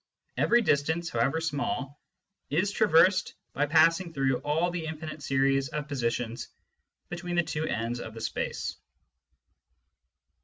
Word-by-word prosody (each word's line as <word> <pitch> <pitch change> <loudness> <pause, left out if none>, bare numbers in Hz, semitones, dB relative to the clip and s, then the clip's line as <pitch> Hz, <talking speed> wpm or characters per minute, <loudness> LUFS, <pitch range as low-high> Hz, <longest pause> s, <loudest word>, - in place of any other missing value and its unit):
Every 240 0 +3
distance, 160 +1 +1
however 125 +7 +1
small, 145 - -3 0.5
is 170 +8 +1
traversed 190 -2 +4 0.2
by 145 +1 +1
passing 165 +3 +4
through 135 -3 +1
all 160 +4 0
the 170 -2 -4
infinite 155 -1 -6
series 135 0 +1
of 150 +2 -4
positions 120 -4 -2 0.6
between 175 0 -4
the 175 - +3
two 160 0 -3
ends 115 +2 -2
of 110 -1 -8
the - - -7
distance. - - -3
150 Hz, 125 wpm, -28 LUFS, 135-170 Hz, 0.6 s, traversed